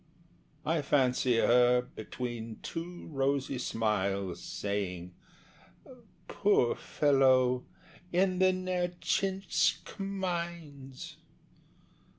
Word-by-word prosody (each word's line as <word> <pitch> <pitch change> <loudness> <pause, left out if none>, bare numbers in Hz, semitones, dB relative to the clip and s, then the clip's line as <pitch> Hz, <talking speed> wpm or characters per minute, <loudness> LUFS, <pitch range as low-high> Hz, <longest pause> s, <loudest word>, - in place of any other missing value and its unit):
I 160 0 +1
fancy 130 -3 +2
her, 125 +1 +4
between 115 -1 -6
two 175 +1 -6
rosy 135 -1 0
smiles, 100 -6 -1
Saying, 90 -3 -4 1.1
"Poor - - +2
fellow, 130 -3 +3 0.4
in 185 +1 +2
the 185 0 +5
Nertchinsk 185 +3 -1
mines!" 170 -8 -5
135 Hz, 70 wpm, -31 LUFS, 120-175 Hz, 1.1 s, the